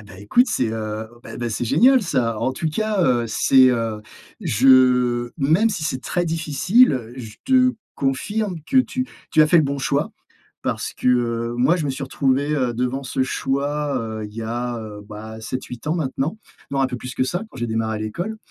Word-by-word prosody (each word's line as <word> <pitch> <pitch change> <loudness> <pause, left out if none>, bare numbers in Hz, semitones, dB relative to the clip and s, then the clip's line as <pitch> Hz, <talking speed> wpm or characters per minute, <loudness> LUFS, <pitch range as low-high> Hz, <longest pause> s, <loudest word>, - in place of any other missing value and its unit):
Et - - -13
bah 95 -3 -13
écoute, 240 - +3
c'est, 120 - 0
heu, 110 0 -4 0.2
bah, - - -9
bah, 120 -1 -3
c'est 115 +3 -2
génial 255 - +5
ça! 120 - 0
En 130 +3 0
tout 160 +4 -2
cas, 215 +2 0
heu, 120 -2 +2
c'est, 130 +3 +5
heu, 115 -3 -2 0.4
je 125 0 +4
même 160 +11 +3
si 175 -6 -3
c'est 130 -4 -2
très 175 -1 -1
difficile, 165 - +3
heu, 120 -2 -4
je 115 -4 -9
te 255 -1 +4 0.2
confirme 180 +7 -2
que 260 - +2
tu 255 0 0 0.2
tu 155 - +5
as - - +4
fait 170 +2 +5
le - - +5
bon 140 0 -2
choix 135 - 0 0.5
parce - - -2
que, - - -1
heu, 120 -1 +1
moi, 135 +9 +3
je 160 - -2
me - - -1
suis 135 +1 -5
retrouvé, 135 +1 0
heu, 125 -4 0
devant 125 +3 -2
ce 130 0 -1
choix, 140 +2 -1
heu, 110 -1 -5
il 105 - -14
y 115 - -5
a, 120 +1 -3
heu, 105 -2 -8
bah, 110 +1 -8
7-8 125 +3 -6
ans 155 - +1
maintenant. 150 +3 -2 0.3
Non, 135 -1 0
un 135 - +3
peu 125 - -5
plus 125 0 -7
que 130 - +1
ça, 175 +9 -2
quand - - -14
j'ai 120 - -2
démarré 110 -1 -1
l'école, 175 - -4
130 Hz, 210 wpm, -21 LUFS, 115-155 Hz, 0.5 s, génial